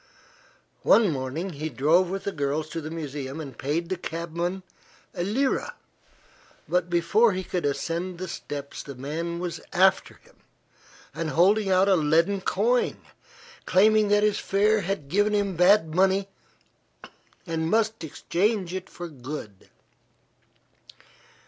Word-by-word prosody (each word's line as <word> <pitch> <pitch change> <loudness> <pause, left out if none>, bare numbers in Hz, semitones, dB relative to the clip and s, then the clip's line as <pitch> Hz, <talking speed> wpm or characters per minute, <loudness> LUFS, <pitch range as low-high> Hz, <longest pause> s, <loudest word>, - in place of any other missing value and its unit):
One 215 -6 +5
morning 145 +7 -3
he 155 0 -4
drove 155 +7 +3
with 195 +1 -4
the 200 - -2
girls 150 0 -2
to 165 +1 -5
the 155 - -6
museum 145 -3 -5
and 140 -5 -7
paid 155 +7 -2
the 185 - 0
cabman 170 +2 -4 0.5
a 175 - -4
lira, 255 +8 0 0.9
but 180 -1 0
before 180 +6 +3
he 185 +1 -3
could 180 -4 -2
ascend 170 +5 -3
the 185 +1 -5
steps 145 -4 -6
the 140 - -9
man 160 +6 -4
was 175 -1 -4
after 190 +1 +3
him - - -24 0.8
and 165 -1 -3
holding 195 +5 +3
out 190 +1 +4
a 195 - +5
leaden 165 +5 +2
coin, 230 +7 +1 0.7
claiming 215 +3 +4
that 205 0 +3
his 210 -1 +2
fare 210 +2 +2
had 195 -6 -3
given 205 +6 +2
him 200 -2 0
bad 180 -2 +4
money 190 +2 +2 1.2
and 165 -2 -2
must 220 -1 +1
exchange 185 +4 -1
it 190 0 -5
for 175 - -7
good. 130 - -9
175 Hz, 135 wpm, -26 LUFS, 155-195 Hz, 1.2 s, One